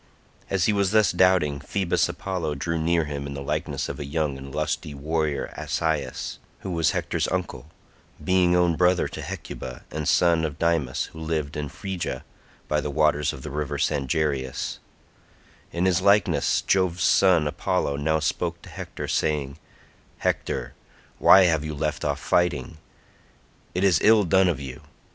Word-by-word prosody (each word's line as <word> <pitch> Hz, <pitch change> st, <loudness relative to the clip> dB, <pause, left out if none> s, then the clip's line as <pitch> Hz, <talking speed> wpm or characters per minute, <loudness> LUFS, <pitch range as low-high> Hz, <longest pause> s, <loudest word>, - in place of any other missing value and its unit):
As 95 Hz, -3 st, +1 dB
he 105 Hz, -, +3 dB
was 100 Hz, -2 st, +2 dB
thus 110 Hz, 0 st, +4 dB
doubting 90 Hz, -6 st, +3 dB
Phoebus 90 Hz, +5 st, 0 dB
Apollo 85 Hz, -6 st, -3 dB
drew 85 Hz, +4 st, -2 dB
near 85 Hz, 0 st, +1 dB
him 70 Hz, -1 st, -5 dB
in 70 Hz, -, -6 dB
the 70 Hz, -, -5 dB
likeness -, -, -2 dB
of -, -, -6 dB
a -, -, -3 dB
young 75 Hz, 0 st, -1 dB
and 65 Hz, 0 st, -9 dB
lusty 75 Hz, +2 st, -3 dB
warrior 75 Hz, 0 st, -2 dB
Asius, 75 Hz, +1 st, -2 dB, 0.2 s
who 95 Hz, -, -5 dB
was 85 Hz, -2 st, +2 dB
Hector's -, -, -1 dB
uncle, -, -, -3 dB, 0.6 s
being 90 Hz, -1 st, +3 dB
own 90 Hz, -2 st, +3 dB
brother 90 Hz, +1 st, +3 dB
to -, -, -7 dB
Hecuba, 65 Hz, -1 st, -7 dB
and 75 Hz, -1 st, -3 dB
son 85 Hz, -2 st, +3 dB
of 75 Hz, -2 st, -3 dB
Dymas 80 Hz, -7 st, 0 dB
who 80 Hz, -, -9 dB
lived 80 Hz, -3 st, -2 dB
in 75 Hz, -1 st, -3 dB
Phrygia 90 Hz, -9 st, -5 dB, 0.4 s
by 75 Hz, 0 st, +1 dB
the 75 Hz, -, -3 dB
waters 75 Hz, 0 st, +2 dB
of 65 Hz, -, -10 dB
the -, -, -6 dB
river 75 Hz, 0 st, -3 dB
Sangarius; 70 Hz, -2 st, -1 dB, 0.9 s
in 85 Hz, +2 st, -1 dB
his 90 Hz, -1 st, +2 dB
likeness 100 Hz, +1 st, +3 dB
Jove's 90 Hz, -2 st, +1 dB
son 90 Hz, -5 st, +4 dB
Apollo 70 Hz, -1 st, -1 dB
now 80 Hz, +2 st, +1 dB
spoke 80 Hz, -, -2 dB
to -, -, -11 dB
Hector -, -, -7 dB
saying, 75 Hz, -2 st, -1 dB, 0.6 s
"Hector, -, -, -2 dB, 0.5 s
why 95 Hz, -, +8 dB
have 80 Hz, -4 st, +2 dB
you 75 Hz, -1 st, -4 dB
left 75 Hz, 0 st, -2 dB
off -, -, -1 dB
fighting? 80 Hz, -3 st, 0 dB, 1.0 s
It 90 Hz, -, 0 dB
is 95 Hz, -6 st, +4 dB
ill 110 Hz, -1 st, +6 dB
done 95 Hz, +1 st, +4 dB
of 85 Hz, -6 st, 0 dB
you. 65 Hz, -3 st, -8 dB
80 Hz, 160 wpm, -25 LUFS, 75-90 Hz, 1.0 s, why